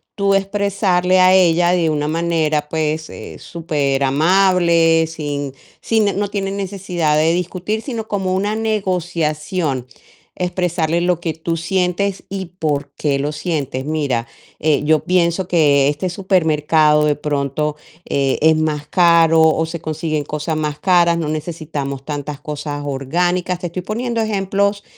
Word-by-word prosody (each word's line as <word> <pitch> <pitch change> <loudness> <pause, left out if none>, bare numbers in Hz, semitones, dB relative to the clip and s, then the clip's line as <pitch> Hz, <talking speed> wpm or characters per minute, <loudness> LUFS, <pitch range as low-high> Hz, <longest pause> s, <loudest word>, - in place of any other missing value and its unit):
tú 200 -1 +1
expresarle 195 -2 +1
a 185 +1 +6
ella 175 -1 +4
de 170 -3 +2
una 150 -1 -1
manera, 155 -2 0
pues, 155 0 -1
eh, - - -9
superamable, 165 +3 +2
sin 145 -4 -4 0.3
sin 215 -4 +1
no 205 0 -1
tiene 195 -1 -2
necesidad 185 -5 -1
de 160 +2 +3
discutir, 185 +5 -3
sino 230 -5 -5
como 190 -3 -1
una 205 +3 0
negociación, 175 - -1 0.5
expresarle 175 -2 0
lo 175 -1 +1
que 165 -2 -3
tú 165 +2 -3
sientes 190 +2 -1
y 190 0 -4
por 145 -2 -1
qué 145 -2 0
lo 145 +2 -1
sientes. 150 -4 -3
Mira, 140 -7 -1 0.3
eh, 150 -2 +2
yo 155 0 +3
pienso 175 0 +1
que 145 -6 +3
este 150 +6 -1
supermercado 155 -5 +2
de 150 - +2
pronto, 145 0 -2 0.3
eh, 135 -1 0
es 160 0 +6
más 155 -2 -1
caro 165 -1 +4
o 160 0 +3
se 165 0 -6
consiguen 155 -1 -2
cosas 150 +2 -3
más 150 -1 -2
caras, 175 -2 +3
no 165 -2 -2
necesitamos 150 -4 -4
tantas 145 -1 -5
cosas 145 -1 -5
orgánicas. 175 +6 -1
Te 180 - -6
estoy 175 +2 -5
poniendo 230 +4 -2
ejemplos, 200 -1 0
165 Hz, 140 wpm, -18 LUFS, 150-185 Hz, 0.5 s, a